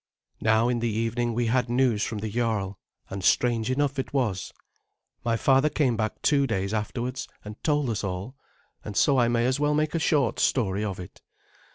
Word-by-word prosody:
Now 110 +1 +3
in 120 -1 0
the 115 0 0
evening 115 +2 -1
we 120 0 +1
had 125 +1 +1
news 120 -3 +2
from 110 - -3
the 110 +1 -3
Jarl, 105 -4 -1 0.3
and 95 -1 -5
strange 120 +1 +2
enough 140 +1 0
it 135 - -4
was. 110 -9 -1 0.7
My 115 -1 +1
father 135 +4 +4
came 135 -6 +1
back 110 0 -3
two 140 -2 +3
days 100 -3 -1
afterwards 120 +4 -3 0.2
and 105 +1 -9
told 150 -3 +1
us 110 -3 -2
all, 95 +6 -4 0.5
and 105 - -6
so 140 -3 +4
I 120 - +4
may 120 0 +1
as 130 +2 +1
well 150 0 +2
make 155 0 0
a 165 - +1
short 145 -6 +1
story 105 -5 +1
of 100 -3 -3
it. 90 - -10
120 Hz, 195 wpm, -26 LUFS, 110-130 Hz, 0.7 s, father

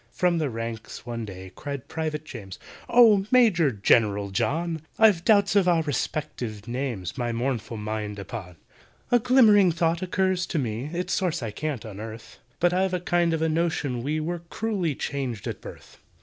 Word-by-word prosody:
From 175 -2 +2
the 150 -3 0
ranks, 115 -1 -6
one 115 -2 -4
day, 95 -2 -9
cried 140 0 -6
PRIVATE 155 -1 -3
JAMES, 105 - -9 0.3
"Oh! 220 -5 +6
MAJOR 215 - +5
GENERAL 105 -2 +2
JOHN, 160 - -1 0.2
I've 210 -6 +5
doubts 200 -1 +4
of 195 -3 +4
our 170 -2 +3
respective 120 -6 -3
names, 120 -8 -4
My 120 -1 -1
mournful 115 -2 -2
mind 105 -1 -4
upon. 100 -3 -7 0.6
"A 245 - +6
glimmering 220 -6 +6
thought 165 +1 0
occurs 185 -1 0
to 170 - -2
me 120 -2 -2
(Its 175 +4 -3
source 180 -8 0
I 110 - -3
can't 140 0 -4
unearth), 110 +2 -9 0.2
But 175 0 +3
I've 185 0 +1
a - - -1
kind 175 -1 +1
of 160 -1 0
a - - +2
notion 155 -6 -1
we 150 +5 -1
Were 170 +3 -3
cruelly 195 -9 -1
changed 130 -8 -4
at - - -5
birth. - - -12
150 Hz, 170 wpm, -26 LUFS, 115-180 Hz, 0.6 s, Oh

